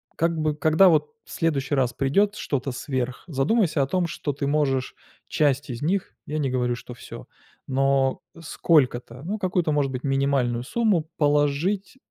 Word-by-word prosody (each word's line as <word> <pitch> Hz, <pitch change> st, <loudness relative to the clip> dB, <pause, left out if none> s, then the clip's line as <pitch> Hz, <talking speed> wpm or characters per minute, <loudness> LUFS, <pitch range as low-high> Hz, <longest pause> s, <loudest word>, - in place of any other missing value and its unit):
как 165 Hz, 0 st, 0 dB
бы, 155 Hz, -1 st, 0 dB
когда 155 Hz, +5 st, +5 dB
вот 150 Hz, -3 st, +2 dB
в -, -, -15 dB
следующий 145 Hz, -4 st, 0 dB
раз 130 Hz, -3 st, +1 dB
придёт 200 Hz, +11 st, +1 dB
что-то 140 Hz, -8 st, -2 dB
сверх, 130 Hz, -1 st, -3 dB
задумайся 160 Hz, -, +1 dB
о 135 Hz, -, +1 dB
том, 175 Hz, +4 st, 0 dB
что 150 Hz, -2 st, -3 dB
ты 140 Hz, 0 st, -3 dB
можешь 140 Hz, -3 st, 0 dB, 0.3 s
часть 145 Hz, -2 st, +1 dB
из 120 Hz, 0 st, -5 dB
них, 185 Hz, +5 st, -1 dB
я 150 Hz, -, -3 dB
не 145 Hz, -3 st, 0 dB
говорю, 125 Hz, -1 st, 0 dB
что 125 Hz, +1 st, -10 dB
всё, 120 Hz, -, -11 dB, 0.4 s
но 135 Hz, 0 st, +1 dB, 0.2 s
сколько-то, 130 Hz, -6 st, +1 dB
ну, 200 Hz, +6 st, -3 dB
какую-то, 180 Hz, -5 st, 0 dB
может 145 Hz, -2 st, +1 dB
быть, 130 Hz, -1 st, -5 dB
минимальную 135 Hz, -3 st, +1 dB
сумму 195 Hz, -, +1 dB
положить, 150 Hz, -, +1 dB
145 Hz, 165 wpm, -24 LUFS, 135-165 Hz, 0.4 s, когда